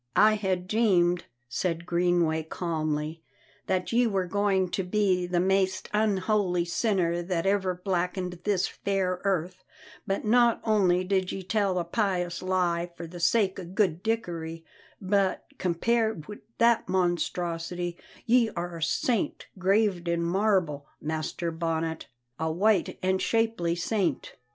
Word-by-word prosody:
"I 215 Hz, +1 st, +6 dB
had 190 Hz, -4 st, -1 dB
deemed," 180 Hz, -5 st, +2 dB, 0.2 s
said 170 Hz, +6 st, -2 dB
Greenway 170 Hz, -2 st, +2 dB
calmly, 155 Hz, -1 st, -3 dB, 0.5 s
"that 180 Hz, -1 st, 0 dB
ye 240 Hz, +1 st, +4 dB
were 195 Hz, -4 st, 0 dB
goin' 195 Hz, 0 st, +1 dB
to 190 Hz, -, -1 dB
be 185 Hz, -2 st, +1 dB
the 175 Hz, 0 st, +1 dB
maist 190 Hz, +1 st, +1 dB
unholy 200 Hz, -4 st, +1 dB
sinner 175 Hz, -2 st, 0 dB
that 175 Hz, -1 st, -2 dB
ever 195 Hz, -2 st, +1 dB
blackened 180 Hz, -1 st, -2 dB
this 200 Hz, -3 st, +1 dB
fair 190 Hz, -2 st, -1 dB
earth; 185 Hz, -1 st, -1 dB, 0.4 s
but 195 Hz, +2 st, -1 dB
not 235 Hz, +1 st, +4 dB
only 190 Hz, -5 st, +3 dB
did 185 Hz, -1 st, 0 dB
ye 190 Hz, -, -5 dB
tell 195 Hz, -1 st, 0 dB
a 175 Hz, -, +1 dB
pious 180 Hz, -2 st, -1 dB
lie 175 Hz, -2 st, 0 dB
for 170 Hz, -, -6 dB
the 175 Hz, +2 st, -9 dB
sake 190 Hz, +2 st, +2 dB
o' -, -, -5 dB
good 180 Hz, -1 st, 0 dB
Dickory, 170 Hz, -7 st, -3 dB, 0.3 s
but, 195 Hz, 0 st, +1 dB
compared 220 Hz, 0 st, 0 dB
wi' 210 Hz, -, -8 dB, 0.2 s
that 230 Hz, -4 st, +3 dB
monstrosity, 175 Hz, -1 st, -1 dB, 0.3 s
ye 235 Hz, -1 st, +4 dB
are 175 Hz, -1 st, -4 dB
a -, -, -9 dB
saint 205 Hz, +7 st, -1 dB
graved 190 Hz, -2 st, +2 dB
in 170 Hz, 0 st, 0 dB
marble, 175 Hz, -6 st, +1 dB
Master 160 Hz, +2 st, -3 dB
Bonnet, 160 Hz, -1 st, -2 dB, 0.3 s
a 160 Hz, 0 st, 0 dB
white 195 Hz, +3 st, +2 dB
and 190 Hz, 0 st, +1 dB
shapely 225 Hz, -7 st, +1 dB
saint." 175 Hz, -, -1 dB
180 Hz, 135 wpm, -27 LUFS, 170-200 Hz, 0.5 s, I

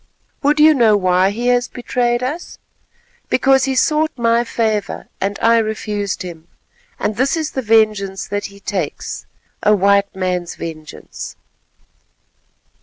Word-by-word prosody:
Would 295 Hz, +2 st, +2 dB
you 310 Hz, +1 st, +7 dB
know 225 Hz, -6 st, +4 dB
why 185 Hz, 0 st, +3 dB
he 235 Hz, +4 st, -1 dB
has 245 Hz, 0 st, +2 dB
betrayed 240 Hz, 0 st, -1 dB
us? 300 Hz, +7 st, -4 dB, 0.7 s
Because 265 Hz, 0 st, +3 dB
he 265 Hz, -1 st, -1 dB
sought 310 Hz, +3 st, +2 dB
my 235 Hz, 0 st, +2 dB
favour, 220 Hz, -3 st, -2 dB
and 195 Hz, +1 st, -1 dB
I 230 Hz, 0 st, +5 dB
refused 210 Hz, -3 st, -2 dB
him, 170 Hz, -2 st, -9 dB, 0.5 s
and 210 Hz, -, -2 dB
this 270 Hz, +6 st, +1 dB
is 315 Hz, -2 st, -2 dB
the 265 Hz, -, -2 dB
vengeance 215 Hz, -4 st, +1 dB
that 205 Hz, 0 st, -3 dB
he 200 Hz, 0 st, -15 dB
takes—a 200 Hz, +2 st, -3 dB
white 200 Hz, 0 st, +2 dB
man's 180 Hz, -2 st, -2 dB
vengeance." 155 Hz, -2 st, -8 dB
215 Hz, 130 wpm, -18 LUFS, 195-245 Hz, 0.7 s, you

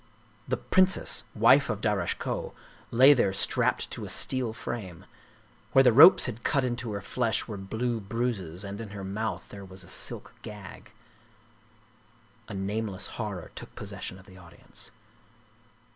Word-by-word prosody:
The 130 Hz, -, 0 dB
princess, 185 Hz, +1 st, +2 dB
wife -, -, +5 dB
of -, -, -1 dB
Darasche -, -, 0 dB
Koh, -, -, -4 dB, 0.3 s
lay 130 Hz, +5 st, +7 dB
there 100 Hz, -8 st, +2 dB
strapped 95 Hz, -, +1 dB
to -, -, -5 dB
a -, -, -6 dB
steel 130 Hz, -3 st, 0 dB
frame. 105 Hz, -6 st, -6 dB, 0.7 s
Where 135 Hz, -, +7 dB
the 125 Hz, -3 st, +5 dB
ropes 145 Hz, -, +9 dB
had 120 Hz, -2 st, -5 dB
cut 140 Hz, -3 st, +2 dB
into 120 Hz, -3 st, -3 dB
her 100 Hz, -, -4 dB
flesh 115 Hz, +2 st, -1 dB
were 110 Hz, -, -5 dB
blue 110 Hz, +5 st, -2 dB
bruises, 100 Hz, -5 st, -3 dB
and 100 Hz, +2 st, -6 dB
in 110 Hz, -, -7 dB
her 100 Hz, -, -6 dB
mouth 105 Hz, +3 st, -3 dB
there 100 Hz, -1 st, -9 dB
was 95 Hz, 0 st, -10 dB
a -, -, -15 dB
silk -, -, -5 dB
gag. 105 Hz, -1 st, -10 dB, 1.6 s
A 105 Hz, -, -7 dB
nameless 100 Hz, 0 st, -2 dB, 0.2 s
horror 100 Hz, -5 st, -5 dB
took -, -, -10 dB
possession 95 Hz, -, -6 dB
of 95 Hz, -, -16 dB
the 95 Hz, -1 st, -15 dB
audience. 85 Hz, -2 st, -10 dB
105 Hz, 155 wpm, -28 LUFS, 95-120 Hz, 1.6 s, ropes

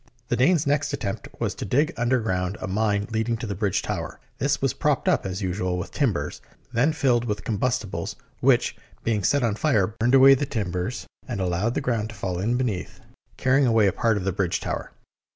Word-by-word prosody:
The -, -, +2 dB
Danes' 145 Hz, +6 st, +3 dB
next 145 Hz, +1 st, +1 dB
attempt 100 Hz, -8 st, -3 dB
was -, -, -1 dB
to -, -, -6 dB
dig 145 Hz, -, +1 dB
under 120 Hz, +2 st, +2 dB
ground 95 Hz, -2 st, -1 dB
a -, -, -4 dB
mine 100 Hz, 0 st, 0 dB
leading 110 Hz, +1 st, 0 dB
to 115 Hz, -, -5 dB
the 100 Hz, -, -3 dB
bridge 100 Hz, 0 st, 0 dB
tower. -, -, -4 dB, 0.2 s
This -, -, +1 dB
was -, -, +1 dB
propped -, -, 0 dB
up, -, -, +2 dB
as 95 Hz, +2 st, -4 dB
usual, 90 Hz, -1 st, -1 dB
with 90 Hz, -, -5 dB
timbers, 90 Hz, -, -1 dB, 0.3 s
then 125 Hz, +7 st, +3 dB
filled 125 Hz, -6 st, +2 dB
with 105 Hz, -2 st, -3 dB
combustibles, 105 Hz, -6 st, -2 dB, 0.2 s
which, -, -, +3 dB, 0.3 s
being 110 Hz, -4 st, 0 dB
set 145 Hz, +4 st, +2 dB
on 115 Hz, -3 st, +2 dB
fire, 110 Hz, -4 st, +2 dB
burned 115 Hz, +5 st, +1 dB
away 135 Hz, +1 st, +9 dB
the 135 Hz, +1 st, 0 dB
timbers 105 Hz, -1 st, -3 dB, 0.2 s
and 120 Hz, -6 st, -3 dB
allowed 95 Hz, +5 st, 0 dB
the -, -, 0 dB
ground 115 Hz, -3 st, -1 dB
to 115 Hz, -, -9 dB
fall 95 Hz, -3 st, -3 dB
in 115 Hz, +6 st, +1 dB
be 130 Hz, -, +1 dB
neath, 105 Hz, -7 st, -4 dB, 0.4 s
carrying 130 Hz, +1 st, +3 dB
away 115 Hz, -3 st, +4 dB
a 95 Hz, -, +2 dB
part 115 Hz, -3 st, +1 dB
of 100 Hz, -, -3 dB
the 95 Hz, -, 0 dB
bridge 90 Hz, -2 st, 0 dB
tower. -, -, -4 dB
110 Hz, 210 wpm, -25 LUFS, 95-125 Hz, 0.4 s, away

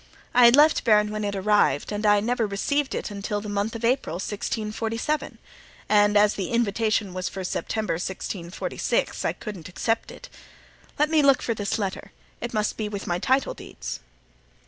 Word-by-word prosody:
I 245 Hz, 0 st, +7 dB
had 235 Hz, +1 st, +8 dB
left 300 Hz, +2 st, +5 dB
Bearn 210 Hz, -2 st, +4 dB
when 215 Hz, 0 st, -3 dB
it 200 Hz, -1 st, -2 dB
arrived 195 Hz, -7 st, +2 dB
and 210 Hz, +1 st, -1 dB
I 205 Hz, 0 st, +5 dB
never 235 Hz, 0 st, 0 dB
received 270 Hz, +8 st, -1 dB
it -, -, -4 dB
until 205 Hz, +1 st, -3 dB
the 210 Hz, -, -7 dB
month 205 Hz, +2 st, -2 dB
of 230 Hz, 0 st, -3 dB
April, 250 Hz, -8 st, +1 dB
1647; 220 Hz, -, -3 dB, 0.5 s
and 205 Hz, 0 st, +4 dB
as 210 Hz, 0 st, +5 dB
the 190 Hz, -3 st, -4 dB
invitation 220 Hz, -3 st, 0 dB
was 185 Hz, 0 st, -3 dB
for 190 Hz, -, -6 dB
September, 210 Hz, +1 st, -2 dB
1646, 175 Hz, 0 st, -3 dB
I -, -, 0 dB
couldn't 190 Hz, -7 st, -8 dB
accept 225 Hz, +5 st, -1 dB
it. -, -, -11 dB, 0.7 s
Let 300 Hz, +2 st, +2 dB
me 315 Hz, -1 st, +5 dB
look 275 Hz, -2 st, +4 dB
for 230 Hz, -, 0 dB
this 205 Hz, 0 st, -2 dB
letter; 195 Hz, -1 st, -4 dB, 0.3 s
it 240 Hz, -, -4 dB
must 215 Hz, -1 st, -1 dB
be 215 Hz, -1 st, -2 dB
with 205 Hz, -1 st, -5 dB
my 175 Hz, 0 st, -1 dB
title 265 Hz, +6 st, +1 dB
deeds." -, -, -7 dB
210 Hz, 175 wpm, -25 LUFS, 200-235 Hz, 0.7 s, had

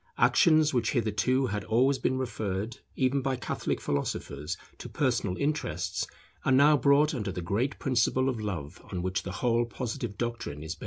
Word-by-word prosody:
Actions 155 Hz, -3 st, +5 dB
which 120 Hz, -3 st, +1 dB
hitherto 125 Hz, +3 st, +1 dB
had 105 Hz, -4 st, -2 dB
always 130 Hz, +7 st, +3 dB
been 130 Hz, -, 0 dB
referred 110 Hz, -3 st, -3 dB, 0.2 s
even 135 Hz, +1 st, +1 dB
by 135 Hz, 0 st, 0 dB
Catholic 125 Hz, -, -2 dB
philosophers 70 Hz, +1 st, -3 dB, 0.2 s
to -, -, -7 dB
personal 120 Hz, -10 st, 0 dB
interests, 150 Hz, +2 st, -1 dB, 0.4 s
are -, -, +1 dB
now 140 Hz, +3 st, +6 dB
brought 145 Hz, +2 st, +4 dB
under 105 Hz, -7 st, -2 dB
the 90 Hz, -, -5 dB
great 105 Hz, +11 st, -1 dB
principle 130 Hz, 0 st, +1 dB
of 130 Hz, -4 st, -1 dB
Love 85 Hz, -9 st, -5 dB
on 90 Hz, -1 st, -3 dB
which 95 Hz, +1 st, -1 dB
the 95 Hz, -, -6 dB
whole 120 Hz, 0 st, +2 dB
Positive 120 Hz, -2 st, -4 dB
doctrine 115 Hz, -11 st, -4 dB
is 80 Hz, +2 st, -4 dB
based. 85 Hz, -, -18 dB
120 Hz, 170 wpm, -29 LUFS, 100-135 Hz, 0.4 s, now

